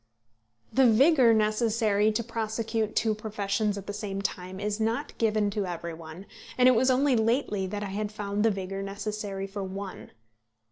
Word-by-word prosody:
The 265 -1 +5
vigour 255 +2 +5
necessary 215 -1 +2
to 235 +2 -1
prosecute 225 -1 -2
two 220 -1 +2
professions 210 -1 -2
at 200 - -7
the 205 - -5
same 205 -2 -4
time 190 -1 -4
is 210 +1 -2
not 225 +6 -1
given 215 -2 +2
to 200 -2 -2
every 170 -1 -5
one, 160 +3 -10 0.3
and 250 0 +6
it - - +8
was 250 +3 +3
only 260 +1 +3
lately 220 -4 +1
that 205 +2 -4
I 200 - -4
had 210 +1 -2
found 205 -1 -3
the 225 - +5
vigour 195 -1 -4
necessary 200 0 -4
for 195 0 -5
one. 190 0 -7
210 Hz, 175 wpm, -28 LUFS, 195-225 Hz, 0.3 s, it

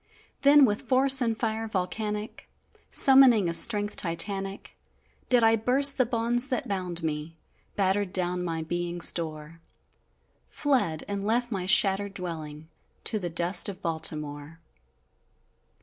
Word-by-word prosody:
Then 285 0 +6
with 210 -3 -2
force 265 +1 +4
and 230 -2 -1
fire 225 -1 -3
volcanic, 210 +2 -5 0.4
Summoning 265 -7 +5
a 170 - -3
strength 205 +3 +3
Titanic, 195 +3 -3 0.5
Did 245 -2 +3
I 225 0 +4
burst 270 +5 +3
the 255 - +2
bonds 240 +2 0
that 255 -3 -4
bound 180 -4 -4
me 155 +1 -5 0.4
Battered 195 -1 -1
down 180 -1 -1
my 165 -2 -4
being's 175 +1 +1
door; 160 -1 -8 0.9
Fled, 245 - -1
and 200 -1 -5
left 240 +3 -1
my 185 -3 -4
shattered 195 +1 +2
dwelling 160 -4 -8 0.4
To 215 - -1
the 175 -3 -5
dust 170 +4 +2
of 190 - -10
Baltimore! 155 -1 -4
195 Hz, 130 wpm, -26 LUFS, 170-230 Hz, 0.9 s, Then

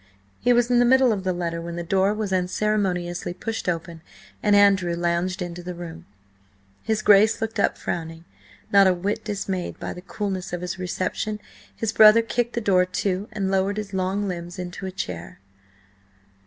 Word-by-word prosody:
He 245 - +2
was 240 0 +3
in 245 - +5
the - - +5
middle 260 0 +5
of 195 -3 -4
the 185 - 0
letter 170 -1 -3
when 170 0 -6
the 170 - -4
door 190 +3 +2
was 210 -3 -2
unceremoniously 180 -2 -1
pushed 225 -1 -3
open 165 -1 -4 0.4
and 205 -1 +3
Andrew 195 -4 +4
lounged 175 +2 -1
into 175 0 -6
the 180 0 -6
room. 170 -1 -9 0.7
His 220 -1 -1
Grace 210 +2 +5
looked 225 -1 -3
up - - +2
frowning. 165 0 -5 0.5
Not 200 -1 +7
a 185 - +3
whit 195 +4 -2
dismayed 195 -3 -4
by - - -4
the 180 - -10
coolness 195 -2 -4
of 175 - -3
his 180 +1 -5
reception, 185 +3 -3 0.4
his 225 -1 -2
brother 220 +1 +7
kicked 240 +1 -1
the 235 - -2
door 190 -4 +4
to 185 +2 -2
and 200 -3 -2
lowered 195 +1 +1
his 205 -2 -5
long 190 +2 -1
limbs 175 0 -5
into 180 +1 -6
a - - -5
chair. 90 - -6
190 Hz, 180 wpm, -24 LUFS, 175-210 Hz, 0.7 s, Not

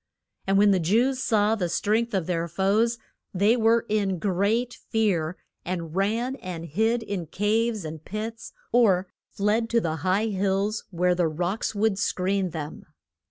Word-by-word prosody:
And 195 0 +3
when 205 0 +6
the 190 - +3
Jews 240 +10 +2
saw 215 -3 +2
the 185 -6 -1
strength 220 +5 0
of 185 -4 0
their 170 -1 -1
foes, 200 +7 +1 0.4
they 205 +5 +4
were 230 0 +3
in 200 -3 0
great 205 +7 0 0.2
fear, 185 -7 0 0.3
and 170 -2 -4
ran 230 +7 0
and 180 -7 -6
hid 220 +9 0
in 195 -6 -4
caves 215 +2 0
and 155 0 -7
pits, 220 +4 -6 0.2
or 200 -6 +4 0.2
fled 215 +3 0
to 235 - +3
the 160 -6 -2
high 185 +6 +1
hills 200 +2 -1
where 180 -1 +1
the 175 -1 +1
rocks 175 +8 -2
would 205 -1 +1
screen 190 0 0
them. 155 -2 -7
200 Hz, 160 wpm, -25 LUFS, 180-225 Hz, 0.4 s, when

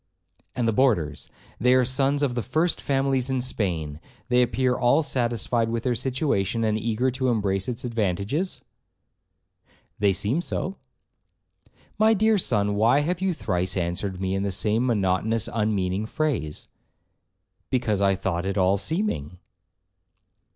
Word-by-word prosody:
'And 120 -2 0
the 115 - +2
boarders—they 120 - 0
are 130 -1 +4
sons 135 +3 +1
of 135 -4 +1
the 120 - -1
first 160 +9 0
families 135 -1 0
in 130 -1 0
Spain, 85 - -2 0.3
they 125 0 +4
appear 125 +1 +1
all 120 +7 +3
satisfied 120 -3 0
with 115 0 -2
their 125 - +1
situation, 120 - -1
and 110 -1 +1
eager 115 +3 0
to 130 +1 -2
embrace 100 -5 0
its 125 +1 -4
advantages.' 115 - -2 1.4
'They 100 -1 +3
seem 110 - 0
so.' 190 +2 -4 1.2
'My 220 +1 +5
dear 220 +1 +3
son, 105 - +1
why 115 +7 +3
have 175 +4 -2
you 190 0 +1
thrice 90 - -2
answered 90 +2 -2
me 95 0 -1
in 95 - -1
the 100 0 -1
same 110 +5 +1
monotonous, 110 0 +1
unmeaning 105 -2 0
phrase?' 125 - -2 1.0
'Because 115 -6 0
I 100 -1 +3
thought 90 -1 -2
it 100 - -2
all 95 +1 +3
seeming.' 100 - -2
115 Hz, 140 wpm, -25 LUFS, 100-130 Hz, 1.4 s, My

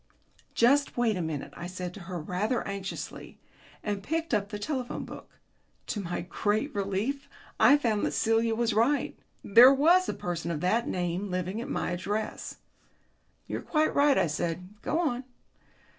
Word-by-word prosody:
"Just 275 +4 +3
wait 235 -3 +2
a 180 - -2
moment," 160 -3 -4
I 175 - -6
said 180 -1 -5
to 205 - -9
her 175 -1 -6
rather 185 +9 -1
anxiously, 200 -1 -6 0.5
and 205 -2 -2
picked 325 +6 -2
up 205 -2 +1
the 210 - -4
telephone 255 +3 -3
book. - - -11 0.5
To 210 - -3
my 175 -2 -3
great 210 - -1
relief 210 +9 -2 0.3
I 260 +7 +7
found 225 -7 0
that - - -3
Celia 225 0 +2
was 230 -1 +1
right. 235 +7 +2 0.3
There 240 +6 +8
was 335 +7 +4
a - - -2
person 170 -1 -3
of 165 -3 -2
that 225 +6 +1
name 180 +2 -2
living 185 +4 -2
at - - -6
my - - -1
address. 205 +5 -3 0.9
"You're - - -4
quite 310 -1 +1
right," 285 -1 +4
I - - +4
said. 170 +3 -3
"Go 315 - -1
on." 270 -7 0
210 Hz, 165 wpm, -28 LUFS, 180-255 Hz, 0.9 s, There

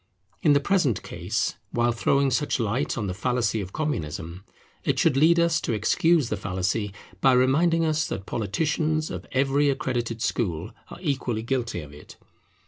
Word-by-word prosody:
In 150 - +5
the 140 - +5
present 145 - +1
case, 90 +6 -2
while 120 0 +1
throwing 135 +4 +2
such 145 +1 0
light 120 +5 -1
on 110 - -2
the 95 - -2
fallacy 115 +1 0
of 95 -1 -7
Communism, 85 - -4 0.4
it - - 0
should - - +3
lead 165 +5 +5
us 170 -1 +2
to - - -1
excuse 145 - +2
the - - -1
fallacy, 95 +2 -2 0.3
by 130 - +5
reminding 160 +7 +3
us 155 0 +1
that 95 - -5
politicians 155 - -1
of - - -6
every 140 +2 +2
accredited 120 -4 -2
school 90 -5 -1 0.2
are - - -9
equally 130 -8 -1
guilty 120 -6 -2
of 75 -1 -11
it. 75 - -13
125 Hz, 165 wpm, -25 LUFS, 105-150 Hz, 0.4 s, In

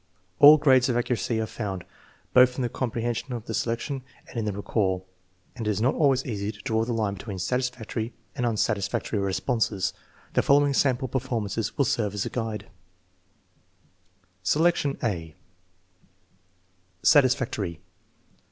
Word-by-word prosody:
All 150 +2 +10
grades 130 -3 +4
of 120 - +1
accuracy 115 -2 -1
are 110 - 0
found, 100 -4 -5 0.5
both 125 0 +6
in 130 - -2
the 120 - 0
compre 115 -1 -3
hension 120 +2 -2
of 115 -2 -7
the - - -5
selection 120 +4 -2 0.3
and - - -14
in 115 -2 -1
the 105 - 0
recall, 95 -2 -1 0.5
and 115 -4 -4
it - - +2
is 105 -1 0
not 125 +5 +2
always 135 -4 +2
easy 105 -4 -3
to 105 - -16
draw 110 -2 0
the 120 - -3
line 110 -3 0
between 100 0 -7
satisfactory 115 +2 -2 0.2
and 125 - -2
unsatis 105 -3 0
factory 105 - -2
responses. 100 +1 0 0.4
The - - +3
following 145 0 +4
sample 130 -1 +2
performances 115 -4 -2
will 140 - +3
serve 105 -5 0
as 100 - -1
a - - -4
guide: 115 -3 -4 1.7
Selection 150 - +2
(a) 85 -8 -2 1.7
Satisfactory. 130 - +3
115 Hz, 150 wpm, -26 LUFS, 105-130 Hz, 1.7 s, All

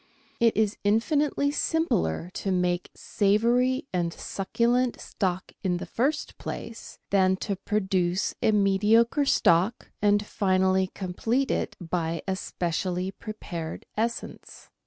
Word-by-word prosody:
It 230 -2 +3
is 215 -2 +1
infinitely 285 +7 +2
simpler 180 - 0
ta 195 - -3
make 180 -1 0
savoury 240 +7 +2
and 175 -2 0
succulent 235 +8 0
stock 185 -2 -3
in 180 -2 +1
the - - -5
first 285 +6 -1
place 230 0 -7
than 190 -1 +4
to 200 - -1
produce 190 -2 0
a - - +4
mediocre 215 +7 +3
stock, 185 -2 +2
and 205 0 +3
finally 190 -2 +2
complete 225 +8 -1
it - - -1
by 165 -2 -2
a 190 - 0
specially 180 +1 -2
prepared 175 -6 -7
essence. 230 +2 -4
200 Hz, 115 wpm, -27 LUFS, 180-230 Hz, -, than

